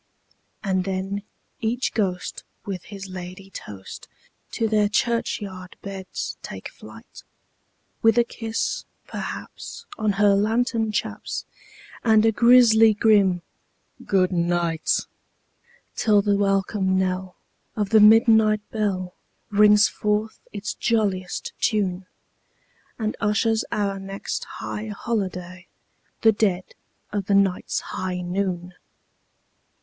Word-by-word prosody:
And 190 -2 +1
then 195 +1 -3 0.4
each 240 +2 -1
ghost 185 -5 -2 0.2
with 190 -4 -5
his 200 -2 -8
ladye 185 +1 -8
toast 100 - -9 0.4
to 225 - -1
their 210 -1 +2
churchyard 205 -5 -2
beds 195 -1 -5
take - - -7
flight, - - -13 0.8
With 225 0 +4
a 240 - +6
kiss, 225 -1 -3 0.2
perhaps, - - -7
on 215 -2 +1
her 205 0 +4
lantern 225 +2 +1
chaps, 210 - -3 0.6
and 220 -2 +5
a 225 - +5
grisly 225 -2 +6
grim 200 -5 +3 0.6
"good 185 -2 +2
night"; 170 -2 +1 0.9
Till 210 -3 +3
the 205 -1 +2
welcome 195 -1 +1
knell 185 0 -1 0.4
of 210 -3 -1
the 220 - +7
midnight 220 0 +6
bell 190 -4 -1 0.4
rings 210 0 +6
forth 210 +1 -1
its 205 0 -4
jolliest 200 -6 -1
tune, 190 -4 0 0.9
And 215 -1 -2
ushers 220 +2 +1
our 200 -2 -1
next 195 +1 -5
high 215 +1 -6
holiday—the 190 -1 -3
dead 195 -4 0 0.4
of 200 -2 -2
the 200 - +3
night's 195 -2 +1
high 185 -1 -4
noon! 180 -1 -2
200 Hz, 105 wpm, -24 LUFS, 185-220 Hz, 0.9 s, the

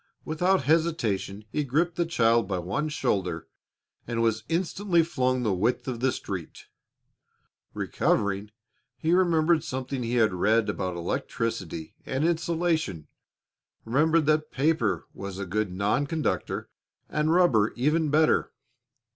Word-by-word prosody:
Without 180 +2 +1
hesitation 120 - 0
he 150 - 0
gripped 160 +6 0
the 170 -1 0
child 115 - +3
by 95 -2 -1
one 140 - -2
shoulder 95 - -1 0.6
and 115 -1 -2
was 110 -1 +1
instantly 175 +1 +1
flung 130 -6 0
the 105 -4 +1
width 115 +9 0
of 125 -3 -3
the 130 +1 +2
street. 90 -8 -6 1.1
Recovering, 100 +1 0 0.5
he 165 +2 +1
remembered 170 -3 +3
something 130 0 -4
he 120 +1 -2
had 110 -5 +3
read 110 +5 +2
about 90 -1 -2
electricity 85 -1 -3
and 135 +4 -1
insulation, 165 - 0 0.8
remembered 155 +7 +3
that 155 0 +2
paper 130 - 0
was 100 -1 -7
a 100 - -4
good 105 +1 -1
non 100 +9 0
conductor 160 +1 -2 0.4
and 155 +1 0
rubber 145 - +4
even 150 +5 +1
better. 155 +2 +3
130 Hz, 130 wpm, -27 LUFS, 105-160 Hz, 1.1 s, rubber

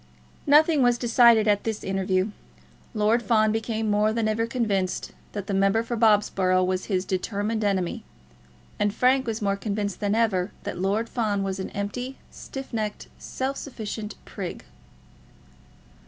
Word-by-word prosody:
Nothing 300 +1 +5
was 245 -1 +4
decided 235 -2 +5
at 205 -1 +2
this 220 -2 -3
interview. 190 +1 0 0.6
Lord 215 +3 +3
Fawn 215 -2 +3
became 225 0 -2
more 210 +1 +2
than 225 0 0
ever 225 +1 0
convinced 205 -7 -1 0.2
that 205 -2 -4
the 200 - -3
member 195 +3 +3
for 235 +1 -3
Bobsborough 205 -4 +3
was 185 0 -1
his 190 -2 -1
determined 205 +4 -2
enemy, 190 -4 -1 0.8
and 205 0 +1
Frank 260 +1 +3
was 225 -1 -2
more 200 -1 +1
convinced 200 -1 -3
than 205 0 0
ever 205 -5 +1
that - - -5
Lord 200 +5 0
Fawn 210 -4 -1
was 195 0 -3
an 190 - -4
empty, 245 +6 -4
stiff 270 -2 -8
necked, 215 -2 -3
self 265 +1 -3
sufficient 220 -5 -6
prig. 185 -4 -6
215 Hz, 150 wpm, -25 LUFS, 195-230 Hz, 0.8 s, Nothing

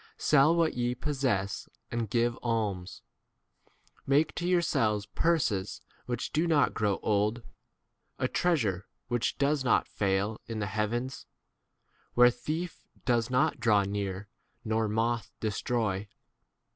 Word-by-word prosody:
Sell 150 +3 +4
what 165 -2 +2
ye 120 0 -1
possess 125 -9 -1 0.2
and 115 -3 -2
give 120 +1 +1
alms; 105 -6 -2 1.0
make 145 +3 +3
to 175 - -3
yourselves 115 - +2
purses 115 - 0 0.3
which 120 -1 -3
do 160 +3 +2
not 155 -3 +3
grow 105 -3 +1
old, 105 +3 +1 0.7
a - - 0
treasure 110 - 0 0.2
which 120 -1 0
does 140 0 +1
not 125 - +3
fail 100 +2 -1
in 115 -2 -4
the 105 - -1
heavens, 110 +6 -2 0.9
where 125 0 +7
thief 155 +8 -5 0.2
does 120 -2 +2
not 125 -1 +2
draw 105 -3 +4
near 100 0 -3 0.4
nor 110 0 +1
moth 115 0 -1
destroy. 105 -2 -1
115 Hz, 120 wpm, -29 LUFS, 105-135 Hz, 1.0 s, where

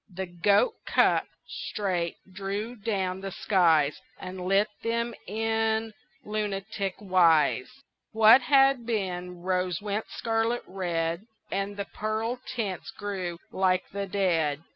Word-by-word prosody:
The 190 +1 -4
goat 200 - +2
cup, - - +3 0.2
straight, 180 -5 -2 0.2
drew 200 +5 -4
down 195 -4 -2
the 195 - -4
skies 165 -8 +3 0.2
And 185 0 -6
lit 195 +3 +3
them 235 +1 -1
in 225 +1 0 0.3
lunatick 205 -2 -3
wise: 170 -9 +3 0.4
What 225 +3 +7
had 270 -1 +4
been 180 -5 -3
rose 180 -2 0
went 205 +1 -2
scarlet 225 +1 -1
red, 170 0 -2 0.2
And 200 +1 -2
the 200 - -3
pearl 220 +4 -3
tints 215 -6 -3
grew 195 -5 -4
like 185 -1 +1
the 200 0 -3
dead. 165 -6 +1
195 Hz, 120 wpm, -27 LUFS, 180-220 Hz, 0.4 s, What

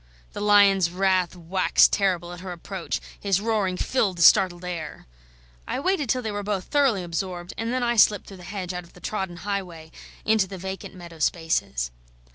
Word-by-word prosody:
The - - -5
lion's 200 -3 +5
wrath 185 0 +1
waxed 180 +2 +3
terrible 180 -3 0
at 175 - -9
her 185 0 -7
approach; 175 +1 -4 0.2
his 195 -2 +1
roaring 205 -4 0
filled 200 -7 0
the 170 - +2
startled 180 -2 +5
air. 170 -3 -6 0.6
I - - -2
waited 365 0 +1
until 250 +1 0
they 220 - -2
were 205 0 -3
both 200 -2 -2
thoroughly 265 -9 +2
absorbed, 175 +1 -4
and 225 +1 -3
then 255 0 0
I 240 0 +1
slipped 210 -2 +5
through 195 - -11
the - - -13
hedge 185 -1 -5
out 180 0 -5
of 170 - -19
the - - -15
trodden 190 -3 -4
highway, 180 -6 -4 0.3
into 215 -3 +3
the 190 0 -8
vacant 190 +1 -7
meadow 170 -2 -11
spaces. 150 - 0
190 Hz, 190 wpm, -25 LUFS, 175-205 Hz, 0.6 s, lion's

